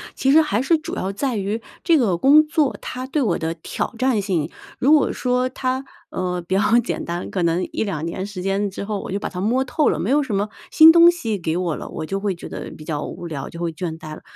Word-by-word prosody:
其 270 - +2
实 320 +2 +7
还 240 -6 0
是 320 +4 +3
主 330 +3 -6
要 190 +1 -2
在 250 +4 -2
于 205 +3 -2 0.2
这 335 -3 +4
个 200 -10 +2
工 295 - +6
作， 305 -3 +1
它 255 +1 -5
对 280 +2 -1
我 205 -9 +1
的 165 0 -2
挑 165 +7 -4
战 255 -4 +1
性。 175 -6 -1 0.3
如 275 +4 +3
果 300 -3 +5
说 250 0 0
它， 260 +1 -2 0.2
呃， 180 -1 -2
比 170 +2 -4
较 200 - +3 0.2
简 235 - -3
单， 175 +1 -4
可 185 - -1
能 170 +2 +1
1-2 170 -7 -2
年 185 +3 -4
时 200 -3 -7
间 195 +2 0
之 195 - -6
后， 205 -1 -3
我 - - -7
就 200 - -1
把 - - -4
它 180 - -6
摸 240 +7 +1
透 300 +3 +1
了， - - +2
没 - - -2
有 295 +2 +4
什 235 -8 -2
么 205 +2 0 0.2
新 320 0 +9
东 340 +1 +8
西 230 -12 -1
给 165 -1 -2
我 175 -3 -1
了， - - -7
我 160 - -5
就 195 +4 -3
会 195 -3 -1
觉 - - -9
得 - - -6
比 155 - -11
较 150 -2 -3
无 175 - -7
聊， 140 -4 -5
就 170 0 -9
会 170 -1 -1
倦 160 0 -5
怠 155 -1 -8
了。 - - -10
205 Hz, 275 characters per minute, -21 LUFS, 175-265 Hz, 0.3 s, 新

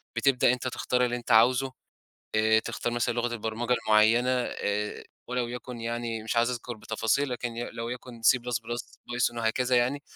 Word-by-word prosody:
بتبدأ 125 -2 +3
أنت 125 0 -3
تختار 125 0 0
اللي 120 0 -1
أنت 120 0 -4
عاوزه، 125 +4 +5 0.6
آآ 110 +1 +4
تختار 120 +1 -3
مثلًا 120 0 0
لغة 120 0 -1
البرمجة 115 +2 -2
المُعَيّنة 110 +3 +4
آآ 105 -4 -2 0.2
ولو 125 -1 -1
يكُن 125 0 -7
يعني 115 -1 -3
مش 115 - -3
عايز 115 +1 +3
أذكر 120 -1 -5
بتفاصيل 110 +6 0
لكن 120 -1 -4
ي 120 - -4
لو 115 0 -5
يكُن 125 -1 -8
++python 120 0 +2 0.4
C 120 -1 +2
وهكذا 125 +2 +1
يعني، 130 +4 +1
120 Hz, 165 wpm, -28 LUFS, 115-125 Hz, 0.6 s, عاوزه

